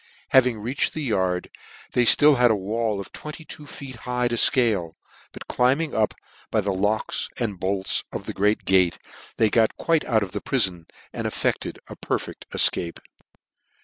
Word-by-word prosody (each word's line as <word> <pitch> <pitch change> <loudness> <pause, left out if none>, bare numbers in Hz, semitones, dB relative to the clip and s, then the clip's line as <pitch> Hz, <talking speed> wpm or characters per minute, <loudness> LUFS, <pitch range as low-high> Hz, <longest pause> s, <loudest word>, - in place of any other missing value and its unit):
Having 125 -3 +4
reached 120 +6 -2
the 155 - -3
yard, 95 -7 -1 0.4
they 125 - +2
had - - +8
(till 150 -1 +6
a 120 -3 +4
wall 105 +2 -2
of 100 - -8
twenty 155 +1 -9
two 150 -1 -10
feet 135 -4 -9
high 125 0 -1
to - - -3
fcale, 110 - +3 0.4
but - - -11
climbing 140 +5 +1
up 110 -1 +1 0.3
by 110 - +1
the 100 -1 -1
locks 105 +3 -1
and 105 -6 -3
boks 95 +1 0
of - - -6
the - - -5
great 105 +2 +1
gate, 95 -3 +3 0.4
they 110 -2 +3
got 115 -2 +2
tjuite 165 -2 +1
out 110 -4 +2
of 95 - -6
the - - -4
prifon, 95 -11 0 0.3
and - - -3
effcded - - -2
a - - -9
perlecl: - - -3 0.2
ticape. 85 -1 +2
110 Hz, 175 wpm, -24 LUFS, 95-125 Hz, 0.4 s, had